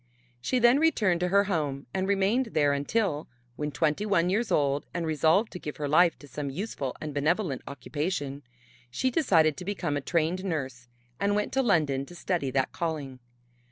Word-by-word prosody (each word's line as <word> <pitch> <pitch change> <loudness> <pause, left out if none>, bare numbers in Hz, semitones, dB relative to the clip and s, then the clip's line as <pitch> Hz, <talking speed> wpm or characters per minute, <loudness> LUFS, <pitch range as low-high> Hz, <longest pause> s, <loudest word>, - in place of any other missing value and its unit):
She 255 - 0
then 240 +3 +5
returned 210 - +2
to 180 - +1
her 200 +2 +4
home 150 -8 -2
and 190 0 -1
remained 200 +6 +2
there 145 -2 +3
until, 150 +2 -1 0.3
when 150 +1 -3
twenty 155 +5 0
one 180 -4 +2
years 225 +5 0
old 140 -1 +1
and 170 -1 -1
resolved 160 - +2
to 180 - -7
give 150 - -6
her 145 - -2
life 170 +4 +4
to 145 - -14
some 140 +1 -4
useful 140 - -4
and 155 -1 -5
benevolent 150 - 0
occupation, 145 +1 -3 0.5
she 255 - 0
decided 165 - +3
to 180 - -6
become 180 -6 -2
a 145 - -1
trained 170 +5 0
nurse 130 -9 -4 0.3
and 205 0 +1
went 210 - -1
to 270 - +3
London 155 - +2
to 175 - -12
study 175 -6 -1
that 130 0 0
calling. 150 -6 -4
160 Hz, 185 wpm, -28 LUFS, 145-195 Hz, 0.5 s, then